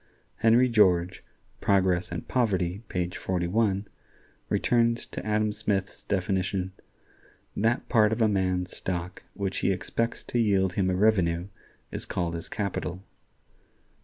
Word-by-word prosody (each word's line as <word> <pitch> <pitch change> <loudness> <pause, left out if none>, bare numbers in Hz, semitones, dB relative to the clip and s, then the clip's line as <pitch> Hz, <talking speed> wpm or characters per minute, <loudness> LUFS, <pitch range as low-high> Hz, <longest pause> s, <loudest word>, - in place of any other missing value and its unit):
Henry 115 +3 +5
George 95 -6 +3 0.4
("Progress 95 -3 +2
and 85 - -5
Poverty," 95 -6 0
page 90 -1 -2
41) 95 +3 0 0.6
returns 115 -1 +2
to - - -7
Adam 105 0 +1
Smith's 100 -3 -2
definition: 95 -1 -1 0.8
"That 115 +4 +1
part 110 -3 +4
of 110 - -1
a 110 - +4
man's 90 -3 0
stock 90 0 -4
which 100 -2 -2
he - - +2
expects 105 +5 -2
to 120 - -2
yield 95 -4 +2
him 95 -1 +1
a 90 - +1
revenue 90 -3 +2 0.4
is - - -5
called 85 -2 -2
his 85 -1 -6
capital." 95 -2 -3
95 Hz, 130 wpm, -27 LUFS, 90-110 Hz, 0.8 s, Henry